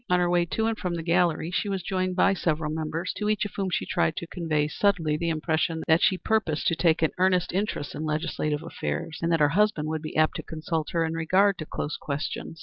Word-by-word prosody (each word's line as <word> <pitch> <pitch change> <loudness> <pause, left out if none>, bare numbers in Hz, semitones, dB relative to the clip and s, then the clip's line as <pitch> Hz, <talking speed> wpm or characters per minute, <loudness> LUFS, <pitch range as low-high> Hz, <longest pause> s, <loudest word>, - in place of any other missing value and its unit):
On 180 0 +4
her 175 0 +2
way 175 -1 +3
to 220 +6 -1
and 225 0 +1
from 180 -5 -3
the 165 - -4
gallery 170 -1 +1
she 200 +3 -1
was 190 -2 -2
joined 185 -1 -1
by 195 +1 +4
several 155 -4 -1
members, 160 +3 -3
to 210 0 -1
each 215 -1 +1
of 205 - -5
whom 195 -2 -1
she 180 - -1
tried 165 -3 +1
to - - -4
convey 160 -3 -1
subtly 165 -2 +1
the 170 +2 -1
impression 160 0 0
that 160 0 +4
she 190 - +3
purposed 200 -8 0
to 165 - 0
take 165 -1 +2
an 160 - +3
earnest 180 -1 +2
interest 190 -6 -2
in 155 - -5
legislative 150 -1 -1
affairs, 155 - -4
and 165 0 0
that 165 - +3
her 145 - +5
husband 180 -3 +1
would 160 -1 -2
be 155 - -7
apt 155 0 +3
to - - -4
consult 160 0 -3
her 165 -1 +1
in 160 - -2
regard 185 +4 +2
to 155 - -5
close 150 - -4
questions. 150 +2 -4
165 Hz, 240 wpm, -26 LUFS, 155-185 Hz, -, her